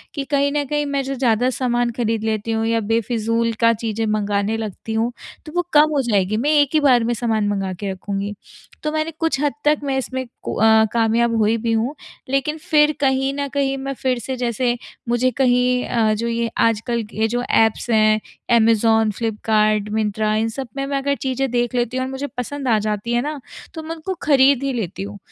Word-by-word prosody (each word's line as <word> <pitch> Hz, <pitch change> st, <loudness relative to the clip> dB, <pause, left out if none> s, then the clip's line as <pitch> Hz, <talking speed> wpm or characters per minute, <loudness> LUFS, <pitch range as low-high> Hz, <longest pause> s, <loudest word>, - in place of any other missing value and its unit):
कि 280 Hz, -, -2 dB
कहीं 280 Hz, 0 st, +2 dB
न 295 Hz, 0 st, 0 dB
कहीं 295 Hz, 0 st, -1 dB
मैं 280 Hz, -1 st, -1 dB
जो 270 Hz, +1 st, -3 dB
ज़्यादा 245 Hz, -1 st, +2 dB
सामान 240 Hz, -2 st, 0 dB
ख़रीद 225 Hz, -2 st, -1 dB
लेती 220 Hz, 0 st, -1 dB
हूँ 225 Hz, 0 st, 0 dB
या 230 Hz, 0 st, +1 dB
बेफिज़ूल 230 Hz, 0 st, 0 dB
का 230 Hz, 0 st, +6 dB
चीज़ें 225 Hz, 0 st, -3 dB
मँगाने 210 Hz, 0 st, 0 dB
लगती 220 Hz, 0 st, -5 dB
हूँ, 225 Hz, +2 st, 0 dB, 0.3 s
तो 305 Hz, -, -9 dB
वो 355 Hz, -, +3 dB
कम 300 Hz, +1 st, +6 dB
हो 275 Hz, -, +3 dB
जाएगी 200 Hz, 0 st, +1 dB
मैं 285 Hz, +6 st, 0 dB
एक 285 Hz, -, +1 dB
ही 310 Hz, -, +4 dB
बार 255 Hz, -5 st, +4 dB
में 240 Hz, +1 st, 0 dB
सामान 220 Hz, -3 st, 0 dB
मँगा 195 Hz, -2 st, -1 dB
के 195 Hz, +2 st, -4 dB
रखूँगी। 200 Hz, +2 st, -4 dB, 0.5 s
तो 305 Hz, -, -1 dB
मैंने 310 Hz, +1 st, -1 dB
कुछ 325 Hz, -5 st, 0 dB
हद 290 Hz, -1 st, +1 dB
तक 300 Hz, 0 st, +4 dB
मैं 270 Hz, -1 st, -1 dB
इसमें 260 Hz, 0 st, -3 dB, 0.2 s
को -, -, -3 dB
अ, 220 Hz, 0 st, +5 dB
कामयाब 230 Hz, 0 st, +2 dB
हुई 220 Hz, +1 st, +2 dB
भी 230 Hz, 0 st, -2 dB
हूँ 230 Hz, +6 st, 0 dB, 0.3 s
लेकिन 275 Hz, +3 st, 0 dB
फिर 300 Hz, -1 st, +3 dB
कहीं 270 Hz, 0 st, +1 dB
न 280 Hz, 0 st, -2 dB
कहीं 275 Hz, -1 st, 0 dB
मैं 275 Hz, +1 st, -4 dB
फिर 255 Hz, -1 st, -1 dB
से 260 Hz, +3 st, -4 dB
जैसे 240 Hz, 0 st, 0 dB, 0.3 s
मुझे 250 Hz, +2 st, +2 dB
कहीं 250 Hz, 0 st, +2 dB
अ, 220 Hz, -2 st, +1 dB
जो 230 Hz, +2 st, -2 dB
ये 230 Hz, 0 st, -1 dB
आजकल 230 Hz, +1 st, +1 dB
ये 220 Hz, +1 st, +1 dB
जो 245 Hz, +2 st, -1 dB
ऐप्स 225 Hz, +2 st, +2 dB
हैं 215 Hz, -1 st, +4 dB, 0.3 s
ऐमज़ॉन, 225 Hz, -1 st, +4 dB
फ्लिपकार्ट, 215 Hz, -1 st, 0 dB
मिन्त्रा 215 Hz, 0 st, 0 dB
इन 225 Hz, +1 st, +1 dB
सब 260 Hz, +2 st, -6 dB
में 275 Hz, -, -1 dB
मैं 275 Hz, 0 st, -1 dB
अगर 280 Hz, +1 st, 0 dB
चीज़ें 265 Hz, 0 st, -2 dB
देख 240 Hz, 0 st, 0 dB
लेती 245 Hz, +1 st, 0 dB
हूँ 260 Hz, -, 0 dB
और -, -, -5 dB
मुझे 275 Hz, +2 st, -4 dB
पसंद 270 Hz, +2 st, -4 dB
आ 225 Hz, -2 st, +4 dB
जाती 215 Hz, +2 st, -2 dB
है 240 Hz, -, +2 dB
ना, 295 Hz, +1 st, -4 dB, 0.3 s
तो 320 Hz, -1 st, -7 dB
मैं 325 Hz, +1 st, -5 dB
उनको 380 Hz, +3 st, -3 dB
ख़रीद 275 Hz, -2 st, +4 dB
ही 275 Hz, -, 0 dB
लेती 195 Hz, -5 st, -4 dB
हूँ। 205 Hz, +1 st, -7 dB
235 Hz, 215 wpm, -20 LUFS, 220-270 Hz, 0.5 s, का